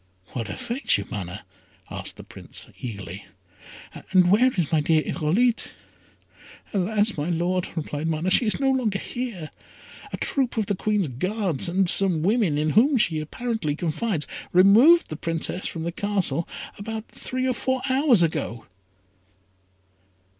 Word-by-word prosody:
"What 115 -5 -5
afflicts 235 - 0
you, 100 - -5
Mana?" 100 -1 -6 0.5
asked - - -6
the - - -11
Prince, - - -10
eagerly; 100 -5 -7 0.8
"and 185 -1 +5
where 230 +6 +5
is 175 - -2
my 160 -2 +3
dear 155 +1 +2
Irolite?" 215 +10 0 1.0
"Alas! 205 +2 +1
my 150 +3 -2
Lord," 175 +2 0
replied 155 -1 -3
Mana, 165 +3 -1
"she 230 - +4
is 215 - +1
no 270 -1 +2
longer 235 -7 0
here. 210 -8 -5 0.6
A - - -4
troop 265 -4 0
of 220 - +1
the 200 - -1
Queen's 205 -1 0
Guards, 180 - -1
and 185 +1 +1
some 175 -3 +5
women, 200 -6 +2
in 155 +1 +1
whom 260 - +4
she 165 -8 +1
apparently 165 -1 -3
confides, 165 +1 -2 0.3
removed 220 - +6
the 155 - -4
Princess 165 +3 -2
from 165 - -5
the 170 - -2
Castle 185 -5 -1 0.3
about 220 +1 -5
three 255 0 -3
or 255 - +1
four 260 +1 -2
hours 260 - +4
ago." 150 -8 -2
185 Hz, 145 wpm, -24 LUFS, 155-225 Hz, 1.0 s, removed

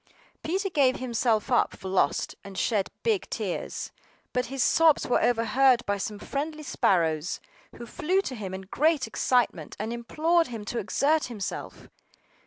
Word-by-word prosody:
PETER 380 +4 -1
gave 270 -5 +3
himself 235 -1 0
up 245 - +2
for 190 - -8
lost, 185 -6 +1
and 195 -1 -10
shed 205 -5 +1
big 440 -5 0
tears; - - -4 0.4
but 250 0 0
his 265 0 -1
sobs 325 -2 +4
were 245 - +2
overheard 240 +2 +3
by 200 0 -1
some 210 +2 -4
friendly 305 +7 -4
sparrows, 165 - +1 0.4
who 235 - -8
flew 355 - 0
to 275 - -5
him 205 -6 -5
in 190 - -6
great 290 - +1
excitement, 235 - 0
and 220 +3 -3
implored 320 +8 +1
him 225 -4 -7
to 235 +3 -3
exert 290 +9 +1
himself. 220 -5 -6
245 Hz, 155 wpm, -27 LUFS, 205-300 Hz, 0.4 s, sobs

